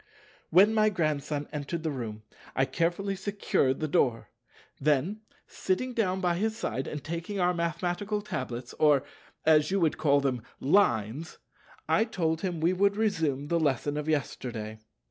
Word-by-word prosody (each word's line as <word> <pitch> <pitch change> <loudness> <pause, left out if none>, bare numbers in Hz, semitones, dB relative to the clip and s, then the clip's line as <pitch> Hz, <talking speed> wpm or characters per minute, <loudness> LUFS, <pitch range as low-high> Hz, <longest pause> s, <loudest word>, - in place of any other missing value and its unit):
When 195 +6 +6
my 215 -1 +4
Grandson 150 -5 -1
entered 150 +3 -4
the 160 - -1
room 110 -5 -5 0.3
I 135 - +3
carefully 175 +6 -1
secured 195 -9 0
the 155 - -1
door. 125 -5 +1 0.5
Then, 155 +9 +1 0.2
sitting 245 +7 -2
down 190 -5 0
by 175 -2 +1
his 220 +3 -1
side 130 +5 -3
and 150 -3 -5
taking 170 +6 -4
our 180 0 +3
mathematical 175 +5 -2
tablets,—or, 130 - 0 0.4
as 155 -1 +5
you 195 - +1
would 165 -4 +1
call 145 -2 +4
them, 130 -4 -1 0.2
Lines—I 145 - 0
told 165 -7 -1
him 180 -4 -2
we 170 +3 +2
would 200 +2 +2
resume 160 -10 0
the 170 - +2
lesson 145 -1 0
of 150 +1 -3
yesterday. 115 -7 -3
160 Hz, 145 wpm, -29 LUFS, 140-190 Hz, 0.5 s, When